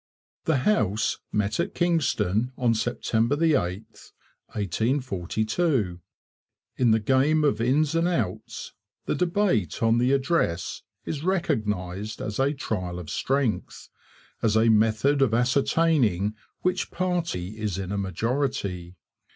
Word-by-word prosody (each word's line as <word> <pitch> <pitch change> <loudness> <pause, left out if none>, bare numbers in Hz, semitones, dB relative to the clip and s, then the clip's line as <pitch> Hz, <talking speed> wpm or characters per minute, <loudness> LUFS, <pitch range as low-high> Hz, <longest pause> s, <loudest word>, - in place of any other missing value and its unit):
The 160 -3 +2
House 110 - +1
met 105 +3 0
at 175 +4 -1
Kingston 125 - +1
on 120 -2 +2
September 115 +2 0
8, 160 +1 +3 0.9
1842. 110 - -1 0.8
In 125 -2 +3
the 110 0 +4
game 135 +7 +2
of 125 -7 +2
Ins 140 +6 +2
and 165 +1 +2
Outs 115 - -3 0.3
the - - 0
debate 170 - 0
on 115 +1 +4
the 125 +2 +2
Address 135 - 0 0.2
is 150 -1 -4
recognized 110 - -1
as 105 +1 -4
a 135 +1 +3
trial 90 -11 -3
of 85 -4 -7
strength, 135 -4 -1 0.5
as 110 -1 +2
a 115 +1 +4
method 110 +6 +3
of 120 -5 +3
ascertaining 125 - +2 0.3
which 185 0 0
party 170 - -2
is 105 -4 -2
in 95 -1 -4
a 100 - -1
majority. 100 -3 -2
115 Hz, 120 wpm, -26 LUFS, 105-145 Hz, 0.9 s, the